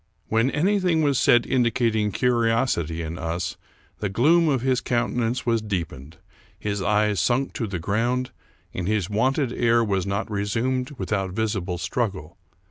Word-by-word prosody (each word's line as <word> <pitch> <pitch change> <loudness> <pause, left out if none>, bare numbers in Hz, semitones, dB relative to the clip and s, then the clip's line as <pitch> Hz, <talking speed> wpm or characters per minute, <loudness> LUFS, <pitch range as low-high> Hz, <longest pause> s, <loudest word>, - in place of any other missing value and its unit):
When 115 +3 +2
anything 180 +1 +1
was 140 -3 +2
said 120 0 +4
indicating 115 -4 +1
curi 120 0 +2
osity 85 -9 0
in 80 +3 -6
us, 85 +1 -3 0.4
the 105 - -2
gloom 155 - +4
of 135 -4 +1
his 130 -1 +1
countenance 120 0 -1
was 115 -2 +1
deepened, 85 -8 -5 0.4
his 100 -1 -3
eyes 105 0 +2
sunk 125 +10 +1
to 115 - -3
the 95 -2 -3
ground, 115 +8 -1 0.4
and 90 -1 -3
his 105 -2 0
wonted 130 +4 +1
air 115 -1 +3
was 100 -3 -1
not 100 +3 -2
resumed 120 +6 -1
without 95 -6 -2
visible 100 -4 -2
struggle. 95 -2 -3
110 Hz, 150 wpm, -24 LUFS, 95-125 Hz, 0.4 s, said